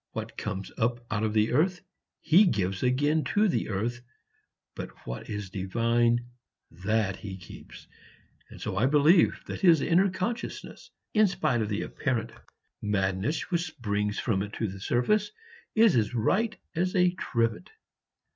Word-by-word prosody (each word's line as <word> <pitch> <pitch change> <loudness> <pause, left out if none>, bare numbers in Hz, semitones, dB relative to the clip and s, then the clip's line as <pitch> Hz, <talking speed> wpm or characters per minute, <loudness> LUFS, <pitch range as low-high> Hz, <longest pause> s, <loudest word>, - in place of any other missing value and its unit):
What - - -5
comes 100 -2 -5
up 120 +1 0
out 105 - 0
of 110 - +1
the 110 0 +2
earth 180 +7 +2 0.4
he 185 +7 +6
gives 95 - -1
again 145 +5 +2
to 210 +1 +5
the 185 - -1
earth, 115 +5 -2 0.7
but - - -6 0.2
what - - -6
is 105 -2 -5
divine, 115 +4 +1 0.5
that 95 +2 -1
he 95 -2 -7
keeps; 90 - -12 0.6
and - - -12
so 95 - -4
I 115 +6 +3
believe 150 +5 +4
that - - -6
his 170 -5 +6
inner 180 +7 +3
consciousness, 210 +6 -5 0.2
in 215 -1 +5
spite 125 -10 0
of 105 - -2
the 105 - -1
apparent 115 -4 -2 0.5
madness 100 - -1
which 170 -1 +2
springs 105 -8 -2
from 100 -6 0
it 105 +1 -5
to 110 - -2
the 95 0 -7
surface, 205 - +1 0.5
is 220 - +5
as 115 +1 +1
right 210 - +1 0.2
as 180 +3 0
a 180 -1 +4
trivet. 115 -10 -1
120 Hz, 155 wpm, -28 LUFS, 105-170 Hz, 0.7 s, he